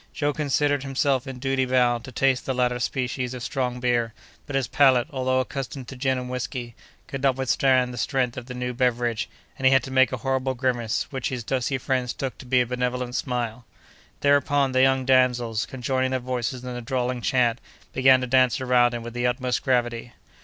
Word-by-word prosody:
Joe 145 0 0
considered 145 -1 +1
himself 135 -1 0
in 135 -1 -6
duty 135 +1 0
bound 125 -2 +2
to 130 - -9
taste 130 +1 +1
the 130 - -1
latter 125 -1 +1
species 125 0 -2
of 125 - -7
strong 125 -2 -2
beer, 120 -2 0 0.3
but 145 - -4
his 135 -2 +1
palate, 130 -4 +4
although 130 -1 0
accustomed 130 -1 -6
to 130 - -8
gin 130 0 0
and 125 0 -5
whiskey, 125 -1 -4 0.3
could 135 - -6
not 135 -2 +3
withstand 130 -1 +2
the 120 - -6
strength 125 -1 0
of 125 -1 -7
the 125 - -7
new 125 0 -3
beverage, 120 -2 0 0.3
and 130 - +3
he - - +5
had 135 0 +4
to 135 - -7
make 130 -2 +4
a 130 - -2
horrible 130 +2 -1
grimace, 120 -3 -1
which 130 -3 -2
his 125 -3 -4
dusky 130 +2 -1
friends 125 -2 -1
took 135 -2 -4
to 130 - -11
be 125 0 +3
a - - +1
benevolent 125 0 -2
smile. 125 -2 -3 0.6
Thereupon, 145 -1 +3
the 130 0 +3
young 135 0 +3
damsels, 125 -4 +2
conjoining 130 0 -1
their 130 0 -1
voices 125 0 -3
in 125 - -5
a 120 0 -5
drawling 125 0 -2
chant, 120 -1 +1 0.3
began 130 0 +5
to - - -1
dance 130 +1 +3
around 125 -2 +3
him 120 - -5
with 120 0 -7
the 120 0 0
utmost 125 0 -1
gravity. 120 -2 -1
125 Hz, 205 wpm, -24 LUFS, 125-130 Hz, 0.6 s, he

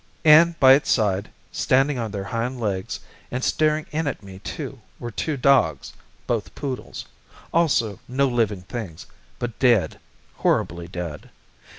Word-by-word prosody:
And 165 +2 +7
by 130 -1 +8
its 140 - +2
side, 100 -3 +1 0.2
standing 135 +1 +2
on 115 -2 -2
their 100 -1 -4
hind 120 +4 -3
legs, 100 -5 -3 0.3
and 130 +1 -3
staring 155 0 +1
in 155 +1 -1
at 135 - -4
me 95 -1 -11
too - - -7 0.2
were 120 - -6
two 155 +3 -2
dogs, 125 - +2 0.3
both - - -2
poodles 135 -3 -5 0.5
also 130 - +2
no 135 +2 +1
living 110 -7 0
things, 95 -6 -7 0.3
but 120 -2 -5
dead, 120 -6 +3 0.4
horribly 85 +1 0
dead. 85 -4 -6
120 Hz, 145 wpm, -23 LUFS, 100-140 Hz, 0.5 s, by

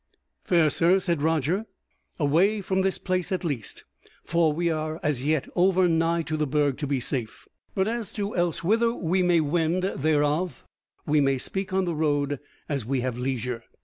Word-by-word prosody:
"Fair 165 -4 +3
sir," 175 +5 +4
said 170 -5 -1
Roger, 160 - 0 0.5
"away 170 +9 +3
from 190 -1 0
this 190 0 0
place 185 -1 -2
at 185 - -1
least; 140 - -4 0.4
for 170 -1 +2
we 170 +3 -1
are 155 0 -2
as 140 -4 0
yet 155 -1 +1
over 185 0 +4
nigh 165 0 +1
to 155 - -3
the 150 -1 0
Burg 145 -1 +1
to 145 - -2
be 140 -1 0
safe: 120 -3 -4 0.3
but 190 0 +1
as 230 -1 -3
to 205 0 -3
elsewhither 210 +7 +1
we 185 0 0
may 175 -2 +4
wend, 165 +3 +1
thereof 155 -2 0 0.4
we 150 0 +3
may 135 -1 +2
speak 190 +9 -3
on 190 0 +1
the 170 - -1
road 145 -3 0 0.3
as 140 -5 -2
we 130 +3 -1
have 125 -1 -3
leisure." 125 -2 -3
160 Hz, 180 wpm, -26 LUFS, 145-185 Hz, 0.5 s, sir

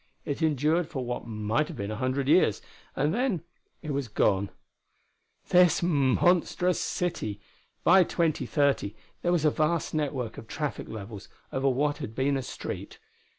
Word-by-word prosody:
It 145 +3 -3
endured 155 +2 +2
for 130 -4 -4
what 120 -1 -4
might 110 +6 0
have - - -8
been 100 +1 -3
a - - -3
hundred 130 +4 -1
years, 155 - +4 0.4
and 145 +4 +1
then 235 -7 0 0.4
it 155 - -3
was 140 -2 -2
gone.... 100 -2 +1 1.0
This 180 -1 +5
monstrous 175 +4 +2
city! 110 - -2 0.4
By 185 +2 +7
2030 145 - 0 0.3
there 175 - +1
was 170 -3 +2
a 150 - +5
vast 155 +1 0
network 135 -7 -2
of 115 - -12
traffic 150 +3 -4
levels 105 -1 -8 0.2
over 135 +1 +2
what 145 +3 +1
had 110 - -6
been 140 +2 +1
a 135 - -1
street. - - -6
145 Hz, 150 wpm, -28 LUFS, 120-165 Hz, 1.0 s, By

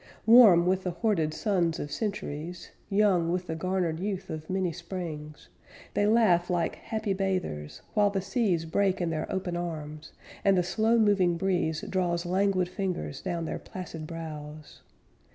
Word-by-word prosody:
Warm 220 -7 +8
with 185 +1 +2
the 185 - -2
hoarded 175 -3 0
suns 175 -2 0
of 145 - -5
centuries, 180 -5 -4 0.2
Young 195 -5 +3
with 180 0 -1
the 160 - -4
garnered 175 -1 -1
youth 195 0 -3
of 155 0 -6
many 185 -2 0
Springs, 165 -4 -7 0.5
They 205 - +2
laugh 210 -6 +4
like 175 -2 0
happy 220 -2 -2
bathers, 185 - -3
while 210 -2 +4
the 200 -1 -1
seas 190 -4 0
Break 190 +3 +1
in 170 -2 -1
their 155 -1 -3
open 185 -2 -2
arms, 155 -3 -5 0.3
And 195 -1 +4
the 180 - +3
slow 220 +6 +2
moving 195 -6 +3
breeze 175 -4 0
Draws 175 -2 -1
languid 185 0 +1
fingers 180 -7 -4
down 170 -1 -3
their - - -4
placid 165 -4 -8
brows. 155 -2 -8
180 Hz, 155 wpm, -28 LUFS, 165-195 Hz, 0.5 s, Warm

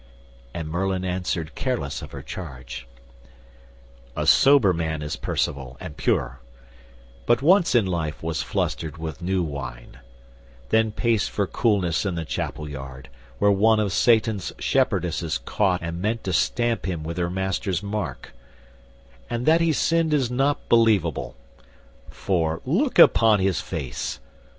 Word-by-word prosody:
And 80 +1 -5
Merlin 95 +3 -1
answered 90 -3 -2
careless 85 - -3
of - - -9
her 70 -1 -8
charge, 65 -7 -8 1.3
"A - - -1
sober 135 -9 +6
man 80 -2 -2
is 75 +1 -3
Percivale 65 -2 -3
and 85 -5 -8
pure; 65 -4 -1 0.9
But 120 +2 +3
once 175 -2 +4
in 115 -4 +4
life 85 -5 -3
was 80 -3 -2
flustered 80 +4 -2
with 80 +2 -6
new 90 +1 0
wine, 70 -6 -7 0.7
Then 110 -1 +3
paced 115 -1 0
for 100 - -1
coolness 95 -6 +1
in 95 -4 -2
the 85 -1 -3
chapel 75 0 -4
yard; 65 -2 -8 0.3
Where 100 - +4
one 110 +3 +4
of 100 -3 0
Satan's 110 -4 +2
shepherdesses 85 -2 0
caught 95 -4 0
And 85 +1 -4
meant 110 +3 -1
to 95 - -2
stamp 120 +5 0
him 85 -4 -3
with 85 +2 -5
her 85 -1 0
master's 95 0 -2
mark; 100 - -5 1.0
And 120 +1 -2
that 165 +2 +5
he 165 -1 +3
sinned 165 +1 +2
is 130 -4 0
not 135 +3 0
believable; 110 -9 +2 0.7
For, 80 -4 -1
look - - 0
upon 110 -2 +6
his 95 -1 +1
face! 75 -8 -5
90 Hz, 140 wpm, -24 LUFS, 80-110 Hz, 1.3 s, sober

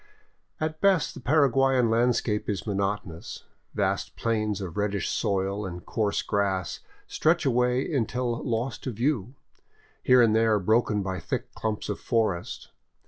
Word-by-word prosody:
At 155 0 -3
best 190 -7 +3
the - - -9
Paraguyan 135 -3 +3
landscape 115 -2 +1
is 100 -3 -2
monotonous, 100 -4 -3 0.3
vast - - -1
plains 110 -3 -1
of 90 -4 -6
reddish 100 -2 -1
soil 100 +1 -1
and 90 -3 -7
coarse 105 -2 -1
grass 95 -4 -1 0.3
stretching 160 -3 +1
away 125 +4 +1
until 120 -2 -1
lost 120 0 -2
to 130 - -2
view, 120 0 -1 0.7
here 125 -1 +6
and 110 -2 +3
there 110 -1 +4
broken 105 +1 +2
by 95 -1 -3
thick - - -4
clumps 110 -1 -3
of 105 - -3
forest. 110 -7 -1
110 Hz, 140 wpm, -27 LUFS, 100-125 Hz, 0.7 s, here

